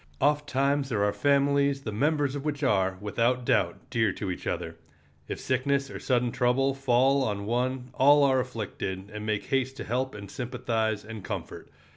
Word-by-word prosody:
Ofttimes 145 -1 +1
there 105 -5 +1
are 105 0 +2
families 140 +4 +2
the 110 - -4
members 145 +4 +1
of 140 -1 -4
which 150 -1 -3
are, 95 -7 +2
without 120 +5 0
doubt, - - +2
dear 110 -3 +2
to 100 -3 -4
each 90 - -6
other. 80 - -3 0.5
If - - -5
sickness 140 +1 0
or - - -6
sudden 125 -2 +1
trouble 125 +2 +2
fall 135 +1 +3
on 100 -4 -2
one 125 +2 -1
all 145 +2 +6
are 135 -2 +4
afflicted, 105 -5 -4
and 105 0 -5
make 105 -1 0
haste 135 0 0
to - - -5
help 130 +3 -2
and 100 -1 -9
sympathize 110 -4 -2
and 110 -2 -8
comfort. - - -6
125 Hz, 175 wpm, -27 LUFS, 110-140 Hz, 0.5 s, all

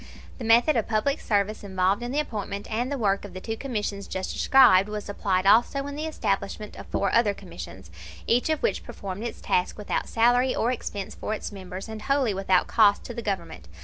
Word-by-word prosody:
The - - -5
method 235 +7 +5
of 230 - 0
public 235 +7 0
service 210 0 0
involved 190 +2 +1
in 240 +1 -4
the 290 - 0
appointment 205 -7 -4
and 240 +5 -1
the 285 - -1
work 200 -4 +1
of 195 -3 -10
the - - -4
two 225 +4 -4
commissions 210 -6 -4
just 190 0 -4
described 210 -7 +5
was 210 -1 -5
applied 195 -2 0
also 240 +7 +4
in 285 0 -6
the 305 +2 -3
establishment 210 -7 -3
of - - -10
four 200 - -1
other 215 -4 +3
commissions, 95 - -10 0.3
each 245 +6 +2
of 315 +6 0
which 470 - 0
performed 195 +1 -7
its 235 - -5
task 180 - 0
without 210 - -3
salary 245 +3 +3
or 235 - +1
expense 205 -5 -5
for 215 - -3
its - - -6
members, 190 0 -8
and 220 -1 -7
wholly 275 -2 +1
without 190 -1 +2
cost 210 -3 +4
to 240 - -7
the 235 - -5
Government. 170 - -4
210 Hz, 210 wpm, -26 LUFS, 195-240 Hz, 0.3 s, method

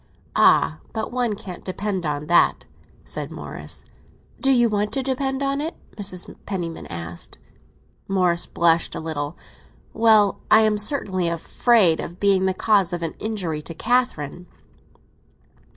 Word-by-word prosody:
"Ah, 75 +3 +4
but 220 0 -3
one 240 -3 0
can't 185 -3 -9
depend 190 -2 -3
on 145 0 -2
that!" 170 +3 +3 0.4
said - - -3
Morris. - - -3 0.5
"Do 270 - +2
you 240 -2 +5
want 210 -1 -1
to 270 - 0
depend 270 +1 -1
on 275 +1 0
it?" 325 +3 -4 0.2
Mrs. 190 -3 -4
Penniman 175 -4 -4
asked. 85 0 -6 0.7
Morris 180 -3 +1
blushed 170 0 +2
a - - -3
little. 155 -1 -4 0.6
"Well, 220 -3 +4
I 220 - +7
am 215 -1 +2
certainly 195 -7 0
afraid 170 +2 +3
of 175 - -6
being 195 -2 +3
the 190 - 0
cause 195 -5 +2
of 175 -1 -3
an 165 - -2
injury 185 -8 -3
to 165 +2 -8
Catherine." 180 - -1
190 Hz, 140 wpm, -23 LUFS, 170-220 Hz, 0.7 s, I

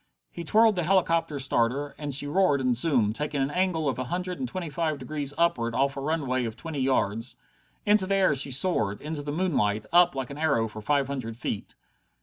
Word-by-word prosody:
He 170 - -7
twirled 220 +5 +4
the - - +1
helicopter 165 -3 +1
starter, 135 +1 0
and 145 -1 -4
she 140 +2 +2
roared 145 -1 +2
and 130 -2 +1
zoomed, 120 -6 +3
taking 150 +1 -2
an 135 +1 0
angle 175 -3 0
of 130 - -1
a 130 - -2
hundred 180 +5 -3
and 255 - -2
twenty 185 -5 -5
five 155 0 -2
degrees 145 -1 -4
upward 120 -9 +1
off 140 +2 +1
a 135 - -5
runway 135 -4 -1
of 110 -1 -5
twenty 160 +1 -6
yards. 120 -3 0 0.5
Into 210 -2 +3
the 195 - +1
air 190 -6 +3
she 140 0 +2
soared, 125 - 0
into 150 0 -5
the 145 0 -5
moonlight, 125 - 0
up 175 -4 +5
like 135 -1 -4
an 140 - -8
arrow 140 -8 +1
for 110 0 -9
five 140 +4 +1
hundred 130 -5 -5
feet. 110 -4 -5
145 Hz, 210 wpm, -26 LUFS, 130-170 Hz, 0.5 s, up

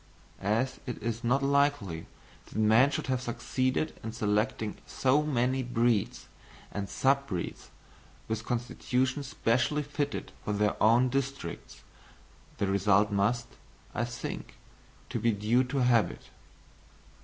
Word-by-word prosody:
And 100 - -5
as 130 +2 -2
it 125 - -3
is 115 +1 -2
not 130 +4 +2
likely 140 - +1 0.4
that - - -14
man 110 +5 +5
should - - -3
have 130 -2 0
succeeded 130 +3 -1
in 110 0 -5
selecting 105 0 0
so 135 +3 +2
many 130 -3 +1
breeds 120 -3 0 0.4
and 100 -1 -4
sub 140 +5 +2
breeds 90 -7 -5 0.6
with 110 0 -2
constitutions 130 +3 -1
specially 130 +4 +1
fitted 145 0 -3
for 105 - -1
their 105 0 +1
own 120 +4 +5
districts, 135 -8 -4 0.7
the 100 - +1
result 100 +2 +3
must, 105 +4 +1 0.5
I 120 - 0
think, 120 -1 -6 0.5
be 115 - +1
due 110 +5 +2
to 130 +1 0
habit. 120 -3 +2
120 Hz, 125 wpm, -30 LUFS, 105-130 Hz, 0.7 s, man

